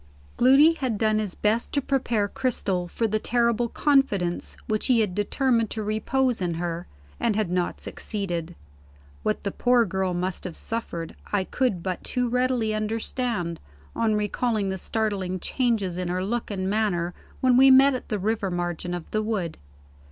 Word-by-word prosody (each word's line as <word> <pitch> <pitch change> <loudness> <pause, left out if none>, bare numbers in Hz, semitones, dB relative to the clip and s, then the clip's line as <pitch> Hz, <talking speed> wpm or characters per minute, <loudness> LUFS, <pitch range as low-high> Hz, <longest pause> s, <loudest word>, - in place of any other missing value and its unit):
Gloody 275 +6 +6
had 260 -9 -2
done 215 0 +2
his 205 -4 -3
best 220 +3 0
to 285 - +3
prepare 245 -6 0
Cristel 195 -7 -1
for 225 +6 -1
the 215 0 0
terrible 235 0 +1
confidence 225 -14 +1
which 215 -1 0
he 250 -3 +4
had 205 -4 0
determined 230 +3 +1
to 220 - -3
repose 230 +3 0
in 175 -2 -1
her, 170 0 -3 0.3
and 225 -3 +1
had 210 -5 0
not 180 -1 -1
succeeded. 175 -5 -4 0.7
What 215 - -1
the 200 - -1
poor 245 +1 +3
girl 190 -1 -1
must 180 +1 -2
have 175 -3 -5
suffered, 170 -8 -4 0.2
I 205 -2 +2
could 195 -4 -1
but 185 -2 -3
too 250 -1 -1
readily 250 -2 +1
understand, 215 -4 -2 0.4
on 220 -2 +2
recalling 210 0 0
the 190 0 -3
startling 195 -4 -1
changes 215 -7 0
in 180 -1 -2
her 180 +1 -1
look 235 +3 -2
and 190 -2 -2
manner 190 -5 0 0.3
when 255 -1 +4
we 265 +2 +7
met 270 +1 +7
at 255 - -5
the 215 - 0
river 205 0 -1
margin 175 0 -3
of 175 - -8
the 215 - +1
wood. 205 -7 -2
215 Hz, 170 wpm, -25 LUFS, 185-240 Hz, 0.7 s, we